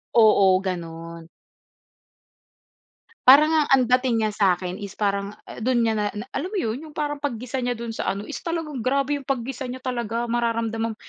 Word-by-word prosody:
Oo, 200 Hz, -4 st, +6 dB
gano'n. 165 Hz, -2 st, -6 dB, 2.0 s
Parang 290 Hz, +4 st, +8 dB
nga 315 Hz, -1 st, +3 dB
ang 255 Hz, -2 st, +4 dB
dating 250 Hz, -2 st, +2 dB
niya 215 Hz, -, +1 dB
sa'kin 180 Hz, -2 st, +1 dB
is 200 Hz, -2 st, -7 dB
parang 200 Hz, -1 st, -1 dB, 0.2 s
dun 240 Hz, +1 st, +1 dB
niya 225 Hz, -1 st, +1 dB
na 210 Hz, -, 0 dB
na, 210 Hz, +5 st, -7 dB
alam -, -, -3 dB
mo 400 Hz, +2 st, -4 dB
'yon? 225 Hz, +1 st, -2 dB
Yung 305 Hz, -, -12 dB
parang 295 Hz, -1 st, -2 dB
paggisa 255 Hz, -3 st, -4 dB
niya 245 Hz, -1 st, 0 dB
dun 235 Hz, 0 st, -6 dB
sa 225 Hz, -, -4 dB
ano 200 Hz, -, -5 dB
is -, -, -4 dB
talagang 325 Hz, -8 st, -4 dB
grabe 275 Hz, +2 st, +1 dB
yung 275 Hz, -, -11 dB
paggisa 265 Hz, 0 st, -3 dB
niya 255 Hz, +1 st, -6 dB
talaga. 235 Hz, -2 st, -2 dB
Mararamdaman 230 Hz, -1 st, -1 dB
235 Hz, 175 wpm, -24 LUFS, 210-265 Hz, 2.0 s, Parang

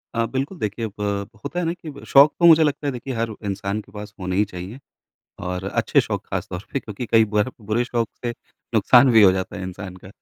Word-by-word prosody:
अ, 115 Hz, 0 st, +1 dB
बिल्कुल, 135 Hz, -, -3 dB
देखिए, 110 Hz, +2 st, -2 dB
ब 100 Hz, -1 st, -2 dB, 0.2 s
होता 175 Hz, -, -3 dB
है 175 Hz, -, -1 dB
ना 165 Hz, -, 0 dB
कि 170 Hz, -3 st, -10 dB
ब 140 Hz, -, -11 dB
शौक 140 Hz, +2 st, +7 dB
तो 170 Hz, -, +4 dB
मुझे 160 Hz, -1 st, +8 dB
लगता 145 Hz, 0 st, -1 dB
है, -, -, +1 dB
देखिए, 125 Hz, +2 st, -5 dB
हर 115 Hz, -1 st, -2 dB
इंसान 100 Hz, +1 st, -2 dB
के 100 Hz, -, -21 dB
पास 105 Hz, 0 st, -9 dB
होने 90 Hz, 0 st, -3 dB
ही 105 Hz, +2 st, +3 dB
चाहिए, 95 Hz, +6 st, -8 dB, 0.6 s
और 90 Hz, +1 st, -4 dB
अच्छे 95 Hz, -, +2 dB
शौक -, -, -4 dB
ख़ासतौर 90 Hz, +3 st, -5 dB
पे 140 Hz, -, -1 dB
क्योंकि 110 Hz, +3 st, -7 dB
कई 110 Hz, +1 st, +5 dB
बार 105 Hz, +4 st, +2 dB
बुरे 110 Hz, +4 st, 0 dB
शौक 120 Hz, -3 st, -1 dB, 0.2 s
से 120 Hz, -, 0 dB, 0.4 s
नुकसान 125 Hz, +1 st, +6 dB
भी 110 Hz, -, +7 dB
हो 95 Hz, -, +8 dB
जाता 95 Hz, 0 st, -3 dB
है 95 Hz, -, -6 dB
इंसान 95 Hz, 0 st, -7 dB
का। 95 Hz, -, -13 dB
110 Hz, 235 wpm, -22 LUFS, 100-130 Hz, 0.6 s, मुझे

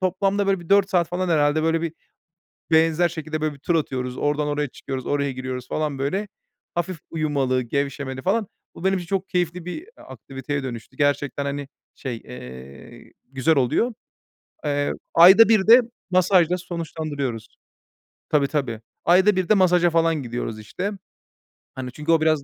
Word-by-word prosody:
toplamda, 195 Hz, +2 st, +1 dB
böyle, 195 Hz, -2 st, +1 dB
bir 170 Hz, -, -13 dB
4 200 Hz, -1 st, +4 dB
saat 175 Hz, -3 st, +2 dB
falan 180 Hz, +1 st, -2 dB
herhâlde, 150 Hz, -1 st, +2 dB
böyle, 165 Hz, 0 st, +1 dB
bir 165 Hz, -1 st, -2 dB, 0.8 s
benzer 165 Hz, +2 st, +4 dB
şekilde, 155 Hz, -1 st, -5 dB
böyle 155 Hz, -1 st, 0 dB
bir, 140 Hz, -, -15 dB
tur 170 Hz, +3 st, 0 dB
atıyoruz. 130 Hz, -5 st, -2 dB
Oradan 145 Hz, 0 st, 0 dB
oraya 145 Hz, 0 st, -1 dB
çıkıyoruz, 130 Hz, 0 st, -6 dB
oraya 140 Hz, -1 st, 0 dB
giriyoruz 130 Hz, -1 st, -5 dB
falan, 150 Hz, -3 st, -2 dB
böyle, 190 Hz, +10 st, -1 dB, 0.5 s
hafif 175 Hz, 0 st, -2 dB
uyumalı, 140 Hz, -5 st, 0 dB
gevşemeli 135 Hz, +1 st, -3 dB
falan. 205 Hz, +5 st, 0 dB, 0.3 s
Bu -, -, -10 dB
benim 190 Hz, 0 st, +3 dB
için 175 Hz, -, -8 dB
çok 195 Hz, 0 st, -2 dB
keyifli 175 Hz, -1 st, -1 dB
bir, 180 Hz, -, -4 dB
eee, 370 Hz, -, -17 dB
aktiviteye 135 Hz, +1 st, -6 dB
dönüştü. 125 Hz, 0 st, -7 dB
Gerçekten, 145 Hz, -1 st, 0 dB
hani, 140 Hz, 0 st, -4 dB, 0.3 s
şey, 125 Hz, -4 st, -5 dB
eee, 65 Hz, -, -11 dB, 0.2 s
güzel 135 Hz, +4 st, +2 dB
oluyor. 140 Hz, -, +1 dB, 0.7 s
Eee, 145 Hz, -1 st, 0 dB, 0.2 s
ayda 190 Hz, +7 st, +8 dB
1 215 Hz, -3 st, +4 dB
de 240 Hz, +3 st, +9 dB, 0.3 s
masajla 180 Hz, -1 st, +4 dB
sonuçlandırıyoruz. 155 Hz, -9 st, -4 dB, 0.8 s
Tabii, 145 Hz, -2 st, +3 dB
tabii. 130 Hz, -7 st, -2 dB, 0.2 s
Ayda 190 Hz, +4 st, +5 dB
1 185 Hz, -1 st, -1 dB
de -, -, +7 dB
masaja 180 Hz, -3 st, +4 dB
falan 165 Hz, -3 st, +1 dB
gidiyoruz, 115 Hz, -2 st, -4 dB
işte. 180 Hz, -, -4 dB, 0.8 s
Hani, 130 Hz, -1 st, -5 dB
çünkü 150 Hz, +5 st, -2 dB
o 165 Hz, -1 st, +4 dB
biraz 155 Hz, -2 st, +2 dB
155 Hz, 160 wpm, -23 LUFS, 135-180 Hz, 0.8 s, de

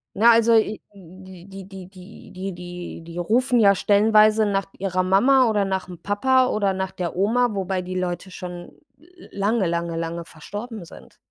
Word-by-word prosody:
Na, 230 Hz, +4 st, +6 dB
also, 230 Hz, 0 st, +4 dB
äh, 215 Hz, -1 st, +2 dB
die 185 Hz, -1 st, -14 dB, 0.2 s
die 190 Hz, -2 st, -10 dB
die 190 Hz, +2 st, -15 dB
die 190 Hz, +1 st, -5 dB
die 175 Hz, -1 st, -8 dB
die 170 Hz, +1 st, -10 dB
rufen 245 Hz, +7 st, +1 dB
ja 200 Hz, -2 st, +5 dB
stellenweise 215 Hz, +2 st, +4 dB
nach 195 Hz, -1 st, -1 dB
ihrer 185 Hz, -1 st, -1 dB
Mama 245 Hz, +8 st, +4 dB
oder 205 Hz, -2 st, +1 dB
nach'm 190 Hz, -2 st, -4 dB
Papa 255 Hz, +5 st, +2 dB
oder 200 Hz, -4 st, 0 dB
nach 190 Hz, 0 st, -3 dB
der 175 Hz, -3 st, -5 dB
Oma, 235 Hz, +6 st, +2 dB
wobei 190 Hz, -1 st, -2 dB
die 185 Hz, +1 st, -6 dB
Leute 180 Hz, +1 st, -4 dB
schon 175 Hz, -1 st, -8 dB, 0.6 s
lange, 200 Hz, 0 st, 0 dB
lange, 170 Hz, 0 st, -2 dB
lange 170 Hz, 0 st, -4 dB
verstorben 205 Hz, +7 st, -8 dB
sind. -, -, -15 dB
195 Hz, 165 wpm, -22 LUFS, 180-215 Hz, 0.6 s, Na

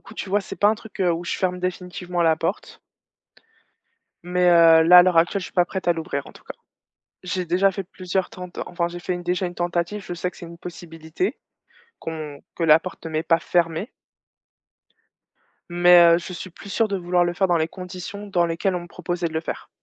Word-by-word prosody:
coup, 220 Hz, -, -14 dB
tu 205 Hz, -, -6 dB
vois, 205 Hz, +2 st, +2 dB
c'est -, -, -8 dB
pas 205 Hz, -, +4 dB
un 215 Hz, -, +3 dB
truc 220 Hz, -3 st, -7 dB
où 170 Hz, +1 st, -6 dB
je -, -, -2 dB
ferme 180 Hz, -1 st, -1 dB
définitivement 180 Hz, -1 st, -3 dB
la 160 Hz, -1 st, +3 dB
porte. -, -, -4 dB, 1.4 s
Mais, 180 Hz, 0 st, +2 dB
heu, 165 Hz, -1 st, +7 dB
là, 180 Hz, +2 st, +9 dB
à -, -, +10 dB
l'heure 180 Hz, -1 st, +2 dB
actuelle, 170 Hz, +4 st, +3 dB
je 185 Hz, -, -6 dB
suis -, -, -13 dB
pas 180 Hz, -, +3 dB
prête 185 Hz, 0 st, -4 dB
à -, -, +6 dB
l'ouvrir, 160 Hz, -4 st, -4 dB
en -, -, -12 dB
tout -, -, -18 dB
cas. -, -, -8 dB, 0.7 s
J'ai 180 Hz, 0 st, -3 dB
déjà 185 Hz, +3 st, +2 dB
fait 195 Hz, +1 st, -5 dB
plusieurs 185 Hz, 0 st, -3 dB
tent 180 Hz, -1 st, -8 dB, 0.2 s
enfin 170 Hz, -1 st, -2 dB
j'ai 175 Hz, 0 st, -8 dB
fait 180 Hz, -, -3 dB
une 175 Hz, -, -5 dB
déjà 180 Hz, +2 st, -1 dB
une 175 Hz, -, -5 dB
tentative, 175 Hz, +4 st, -2 dB
je 175 Hz, -, -6 dB
sais 180 Hz, +1 st, -3 dB
que -, -, -21 dB
c'est 170 Hz, -, -9 dB
une 170 Hz, -, -12 dB
possibilité 170 Hz, -, -5 dB, 0.6 s
qu'on 155 Hz, -3 st, -7 dB
que 170 Hz, -, -2 dB
la 160 Hz, -1 st, +6 dB
porte 180 Hz, -1 st, -9 dB
m'est 160 Hz, -1 st, -2 dB
pas 165 Hz, 0 st, +3 dB
fermée 170 Hz, +4 st, -1 dB, 1.8 s
mais 175 Hz, 0 st, +6 dB
heu, -, -, +3 dB
je 175 Hz, -, -8 dB
suis 185 Hz, +1 st, -7 dB
plus 195 Hz, +3 st, -12 dB
sûre 225 Hz, +3 st, +2 dB
de 200 Hz, -, -1 dB
vouloir 175 Hz, 0 st, +1 dB
le 175 Hz, -, -1 dB
faire 190 Hz, +1 st, +2 dB
dans 175 Hz, -, +3 dB
les 160 Hz, -1 st, +1 dB
conditions 185 Hz, +3 st, -8 dB
dans 175 Hz, -3 st, +2 dB
lesquelles 170 Hz, +3 st, -1 dB
on -, -, -3 dB
me 175 Hz, -, -10 dB
proposait 175 Hz, 0 st, -3 dB
de -, -, -13 dB
le 160 Hz, -, -1 dB
faire. 160 Hz, -, -6 dB
175 Hz, 225 wpm, -23 LUFS, 170-185 Hz, 1.8 s, à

